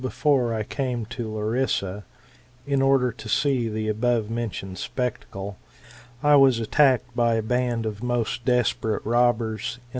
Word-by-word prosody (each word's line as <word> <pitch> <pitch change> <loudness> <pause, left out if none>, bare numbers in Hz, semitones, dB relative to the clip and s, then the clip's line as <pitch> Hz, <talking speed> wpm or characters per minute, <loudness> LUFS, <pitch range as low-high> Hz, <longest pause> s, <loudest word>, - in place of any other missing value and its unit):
5 - - -10
before 130 -2 +1
I 110 -1 -1
came 125 -1 -3
to 115 +1 -5
Larissa^, 110 -2 -1 0.6
in 140 -1 +1
order 135 -2 +3
to 120 - -10
see 130 -6 +1
the 110 0 -3
above 115 0 0
mentioned 100 -5 -4
spectacle, 100 -5 -4 0.6
I 145 0 +6
was 135 -3 +5
attacked 130 +2 +2
by 120 -1 +2
a 110 - 0
band 120 0 0
of 105 -1 -4
most 120 -1 -1
desperate 120 -3 0
robbers, 120 -1 +1
in. - - -22
120 Hz, 150 wpm, -24 LUFS, 110-125 Hz, 0.6 s, I